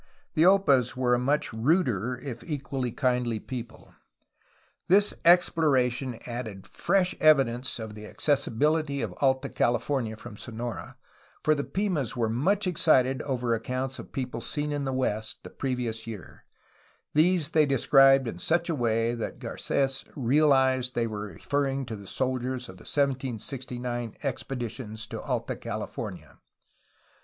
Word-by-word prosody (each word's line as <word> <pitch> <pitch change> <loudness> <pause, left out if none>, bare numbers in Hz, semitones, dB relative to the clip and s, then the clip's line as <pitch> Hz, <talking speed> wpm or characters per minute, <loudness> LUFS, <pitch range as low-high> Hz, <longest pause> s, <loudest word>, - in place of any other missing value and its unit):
The 160 +3 +5
Opas 140 - +4
were 125 -1 +2
a 120 - +3
much 140 0 0
ruder, 125 - +1
if 125 -3 -7
equally 135 -3 -3
kindly 125 -2 0
people. 120 0 -8 0.9
This 205 +3 +5
exploration 135 -8 +3
added 115 -5 -6
fresh 185 0 +1
evidence 130 -5 +3
of 110 -2 -6
the 105 0 -9
accessi 140 -1 0
bility 150 0 +1
of - - -3
Alta 135 0 +2
California 120 -2 0
from 110 -1 -10
Sonora, 120 +1 -6 0.5
for 155 - +4
the 145 -2 -1
Pimas 180 - -1
were 115 -2 +1
much 190 - +1
excited 135 -7 +3
over 125 -4 -1
accounts 130 +3 -3
of - - -10
people 130 -2 -4
seen 150 0 -2
in 145 -1 -2
the 135 - -1
west, 110 -4 -2
the - - -10
previous 120 -4 -3
year; 105 -6 -9 0.7
these 165 0 +3
they 155 -2 +4
described 135 0 +5
in 90 -6 -5
such 170 - +1
a - - 0
way 115 -2 +1
that 115 -2 -4
Garc^s 135 -1 -1
realized 130 -1 +3
they 120 - +1
were 105 -2 -4
referring 135 - -1
to 115 -2 -5
the 100 -2 -11
soldiers 130 +1 -2
of 95 -7 -11
the - - -15
1769 125 -3 -2
expeditions 120 -4 -4
to - - -6
Alta - - -2
California. - - -6
130 Hz, 140 wpm, -27 LUFS, 120-145 Hz, 0.9 s, The